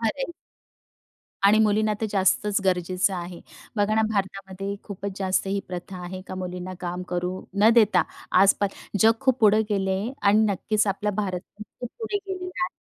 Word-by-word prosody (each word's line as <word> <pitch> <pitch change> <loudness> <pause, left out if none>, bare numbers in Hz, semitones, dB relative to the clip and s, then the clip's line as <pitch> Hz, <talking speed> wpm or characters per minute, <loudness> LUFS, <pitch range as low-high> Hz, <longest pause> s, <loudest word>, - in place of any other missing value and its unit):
अरे! 270 +7 -1 1.1
आणि 210 +2 +6
मुलींना 215 0 +2
तर 220 - 0
जास्तच 200 +1 +2
गरजेचं 185 +1 +1
आहे. 175 -1 -6 0.4
बघा 205 +1 +2
ना, 220 - +3
भारतामध्ये 195 0 -3
खूपच 200 -1 -6
जास्त 190 0 0
ही 200 +1 -1
प्रथा 180 +1 -6
आहे, 185 +1 -6
का - - -6
मुलींना 180 0 -5
काम 180 0 -4
करू 180 +1 -2 0.2
न 220 - +8
देता, 215 -3 +5 0.4
आस-पास 200 0 +4 0.3
जग 225 +1 +7
खूप 260 -2 +2
पुढे 215 0 +6
गेले 195 -2 0
आहे 225 +7 -3 0.2
आणि 210 +2 +5
नक्कीचं 210 +2 0
आपला 205 +2 -1
भारत 190 -3 -2 0.2
पण 210 - -6 0.2
खूप 245 - -4
पुढे 445 -3 -2
गेलेला 365 -2 -4
आहे. - - -3
200 Hz, 170 wpm, -25 LUFS, 185-215 Hz, 1.1 s, न